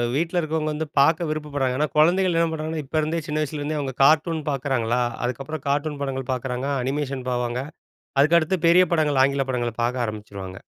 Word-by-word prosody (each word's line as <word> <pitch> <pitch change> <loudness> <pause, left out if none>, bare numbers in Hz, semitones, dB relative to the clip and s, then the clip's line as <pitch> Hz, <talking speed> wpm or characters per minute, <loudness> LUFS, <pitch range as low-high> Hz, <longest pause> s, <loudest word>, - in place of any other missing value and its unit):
வீட்ல 170 +3 0
இருக்கிறவங்க 155 -1 -1
வந்து 155 +1 -3
பார்க்க 160 +4 +3
விருப்பப்படுறாங்க. 145 -4 -2
ஏன்னா, 150 - +2
குழந்தைகள் 175 +2 +4
என்ன 165 - +3
பண்ணுறாங்கன்னா, 155 0 -3
இப்போ 155 - -3
இருந்தே, 160 +2 -1
சின்ன 150 0 -1
வயசுலேருந்தே 150 +1 -3
அவங்க 135 -2 -3
கார்ட்டூன் 155 +2 +4
பார்க்குறாங்களா. 125 -3 0 0.2
அதுக்கப்புறம் 135 +4 -4
கார்ட்டூன் 145 +1 -1
படங்கள் 135 -1 -4
பார்க்குறாங்க. 125 +1 -3 0.2
அனிமேஷன் 135 -1 -3
போவாங்க. 120 0 -1 0.6
அதுக்கடுத்து 165 +4 +4
பெரிய 180 +2 +6
படங்கள், 150 -4 +2
ஆங்கில 140 0 +1
படங்கள 120 -2 -1
பார்க்க 120 0 0
ஆரம்பிச்சுருவாங்க. 100 -3 -7
145 Hz, 160 wpm, -23 LUFS, 130-155 Hz, 0.6 s, பெரிய